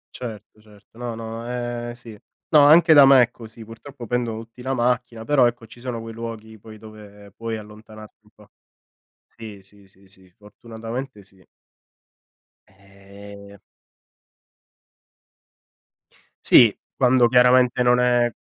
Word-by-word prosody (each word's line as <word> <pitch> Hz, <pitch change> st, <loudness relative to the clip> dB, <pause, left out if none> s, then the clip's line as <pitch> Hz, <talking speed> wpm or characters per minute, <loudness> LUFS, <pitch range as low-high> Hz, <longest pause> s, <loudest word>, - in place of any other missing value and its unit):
Certo, 110 Hz, -3 st, -10 dB
certo. 105 Hz, 0 st, -23 dB
No, 120 Hz, -2 st, -6 dB
no, 115 Hz, 0 st, -8 dB
è 120 Hz, -1 st, -5 dB
sì. 120 Hz, -2 st, -13 dB, 0.3 s
No 155 Hz, -, +5 dB
anche 160 Hz, +3 st, +6 dB
da 145 Hz, -2 st, +8 dB
me 135 Hz, -2 st, +6 dB
è 120 Hz, -, -3 dB
così, 115 Hz, -1 st, -13 dB
purtroppo 120 Hz, +3 st, -12 dB
pendono 115 Hz, -2 st, -3 dB
tutti 115 Hz, +2 st, -17 dB
la 130 Hz, +1 st, -3 dB
macchina, 120 Hz, -2 st, -2 dB
però 140 Hz, -3 st, +3 dB
ecco 120 Hz, -1 st, -6 dB
ci 115 Hz, -, -17 dB
sono 120 Hz, -2 st, -6 dB
quei 115 Hz, 0 st, -9 dB
luoghi 110 Hz, -1 st, -9 dB
poi 110 Hz, +1 st, -14 dB
dove 105 Hz, -2 st, -15 dB
puoi 115 Hz, -1 st, -5 dB
allontanarti 110 Hz, 0 st, -14 dB
un -, -, -24 dB
po'. -, -, -23 dB, 0.7 s
Sì, 110 Hz, -4 st, -13 dB
sì, 100 Hz, +1 st, -20 dB
sì, 95 Hz, 0 st, -25 dB
sì, 95 Hz, -1 st, -16 dB
fortunatamente 115 Hz, +3 st, -9 dB
sì. 95 Hz, 0 st, -19 dB, 1.3 s
Eh. 100 Hz, +1 st, -16 dB, 2.9 s
Sì, 115 Hz, -4 st, +5 dB, 0.2 s
quando 125 Hz, -2 st, +3 dB
chiaramente 125 Hz, 0 st, +3 dB
non 125 Hz, 0 st, +3 dB
è 120 Hz, -1 st, +1 dB
115 Hz, 135 wpm, -21 LUFS, 105-125 Hz, 2.9 s, da